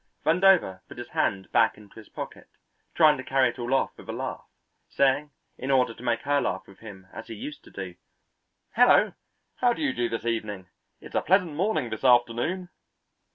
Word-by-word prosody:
Vandover 170 - +4
put - - -12
his 120 - -7
hand 95 -2 -1
back - - +3
into 105 +1 -15
his 110 - -15
pocket, - - -8 0.5
trying 155 -3 +6
to 130 - -6
carry 130 -1 +2
it 120 - -9
all 120 +1 -3
off 135 - +1
with - - -14
a - - -1
laugh, - - -5 0.4
saying 140 +2 +2 0.3
in 130 - -4
order 125 -3 +3
to 115 - -15
make 120 -1 0
her 145 0 +1
laugh 95 +1 -2
with 100 - -17
him 100 -4 -11
as 110 - -8
he 115 - -7
used 150 +8 -8
to - - -14
do, 95 -2 -7 0.8
"Hello! - - +5 0.4
how 245 -1 +3
do - - -7
you 270 - +1
do 120 -1 -1
this 115 0 -4
evening? 105 -5 -3 0.3
It's - - -12
a - - +1
pleasant 180 -3 +2
morning 155 - -1
this 110 - -5
afternoon." 125 +9 +2
125 Hz, 200 wpm, -26 LUFS, 110-150 Hz, 0.8 s, trying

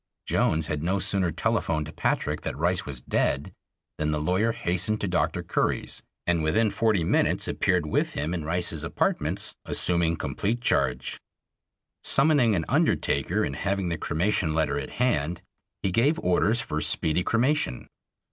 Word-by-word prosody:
Jones 80 0 +1
had 75 -2 -3
no 90 +5 0
sooner 95 -2 +1
telephoned 80 0 -1
Patrick - - -1
that - - -4
Rice 85 +2 0
was 65 -4 -7
dead - - -1 0.5
than 75 0 0
the 75 -1 0
lawyer 95 +9 +1
hastened 110 -2 0
to 100 - 0
Dr. 90 -2 0
Curry's, - - -1 0.2
and 85 -2 +1
within 105 +8 +2
forty 110 -6 +1
minutes - - +1
appeared 90 -3 +1
with 75 - 0
him 75 +4 -2
in 85 -3 -3
Rice's 80 -1 0
apartments, 80 - -1
assuming 85 -2 +1
complete 110 +7 -2
charge. 65 - 0 0.8
Summoning 135 -6 +3
an 80 - -1
undertaker 70 -1 +1
and - - -2
having 100 -2 -1
the 85 - -2
cremation 85 -1 0
letter 75 -3 +1
at - - -6
hand, 90 - 0 0.4
he 95 - +1
gave 135 - +3
orders 105 +6 +2
for 75 0 -3
speedy 80 +2 +1
cremation. 120 - 0
90 Hz, 150 wpm, -26 LUFS, 80-105 Hz, 0.8 s, Summoning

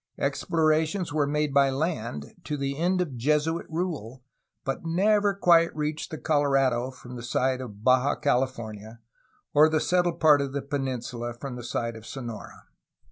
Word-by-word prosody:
Explorations 160 0 0
were 150 -2 +1
made 150 0 0
by 140 -1 +5
land, 130 - -3
to 150 - -3
the 140 0 -2
end 180 +4 +1
of 145 -8 -3
Jesuit 150 +6 0
rule, 155 - -4 0.4
but 135 - -3
never 200 +4 +2
quite 170 -3 +4
reached 150 0 -3
the 155 - -6
Colorado 135 -5 +2
from 125 -1 -11
the - - -7
side 130 +2 0
of 105 -4 -9
Baja 130 +3 +4
California 115 -5 -2 0.5
or 150 +2 +6
the 155 0 +2
settled 175 +1 +1
part 150 -3 +6
of 140 -1 -3
the 140 -1 -2
peninsula 125 -4 -3
from 130 +1 -6
the 120 - -7
side 115 -1 -3
of 110 0 -11
Sonora. 120 -5 -8
140 Hz, 160 wpm, -26 LUFS, 125-160 Hz, 0.5 s, or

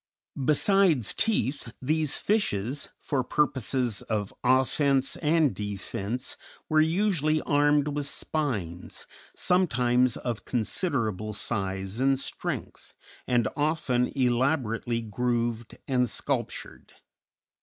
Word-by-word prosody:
Besides 165 - +3
teeth 140 - 0
these 155 +2 0
fishes, 140 - 0
for 135 -3 -1
purposes 130 -5 0
of 105 -3 -3
offence 130 +1 +2
and 155 -2 +2
defence, 105 +3 -4 0.3
were 155 -1 +4
usually 160 -2 +2
armed 145 0 +3
with 145 -1 -2
spines, 110 - -3 0.3
sometimes 125 -9 +2
of 120 -3 -4
considerable 110 - -1
size 95 -1 -2
and 135 0 +3
strength, - - -5 0.3
and 120 -3 +2
often 145 -5 +1
elaborately 120 -2 +1
grooved 120 +1 -2
and 125 -2 +2
sculptured. - - -4
130 Hz, 90 wpm, -27 LUFS, 115-150 Hz, 0.3 s, were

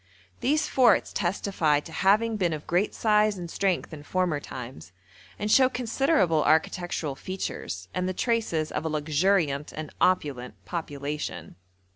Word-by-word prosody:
These 300 +4 +1
forts 240 -6 +3
testify 175 -5 +1
to - - -12
having 215 +4 +2
been 180 -5 0
of 150 -1 -6
great 180 +4 0
size 210 -2 +3
and 170 -2 -7
strength 190 -4 -1
in 150 - -8
former 175 -1 0
times, 120 - -9 0.4
and 210 0 -2
show 260 +1 +6
considerable 230 - +1
architectural 160 -1 +1
features, 135 - -5
and 180 0 -1
the - - -2
traces 215 -11 0
of - - -3
a 160 - -2
luxuriant 155 0 +1
and 155 -1 -7
opulent 145 -9 +1
population. 145 - -5
175 Hz, 140 wpm, -26 LUFS, 150-205 Hz, 0.4 s, show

